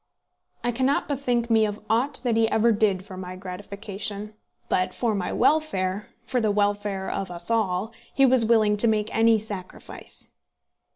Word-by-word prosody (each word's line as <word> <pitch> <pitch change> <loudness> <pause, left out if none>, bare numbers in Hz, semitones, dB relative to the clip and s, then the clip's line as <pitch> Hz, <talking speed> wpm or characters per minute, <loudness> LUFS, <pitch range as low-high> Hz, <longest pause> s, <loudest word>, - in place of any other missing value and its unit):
I 240 - +1
cannot 260 +4 +1
bethink 245 -4 0
me 220 -1 +5
of 210 -1 -1
aught 245 +4 +1
that 240 -3 +1
he 225 0 +3
ever 230 +1 +3
did 205 -3 +1
for 190 -2 -9
my 185 0 -6
gratification; 200 +2 -6 0.3
but 185 - 0
for 235 -3 0
my 195 -3 -2
welfare, 205 -11 +1 0.2
for 250 0 0
the 215 - +2
welfare 205 -1 0
of 195 - -3
us 175 +5 -5
all, 215 -1 0 0.2
he 275 - +4
was 255 -2 +5
willing 215 -2 +3
to 230 - +3
make 215 -1 0
any 225 0 +5
sacrifice. 205 -4 -7
215 Hz, 165 wpm, -25 LUFS, 200-230 Hz, 0.3 s, me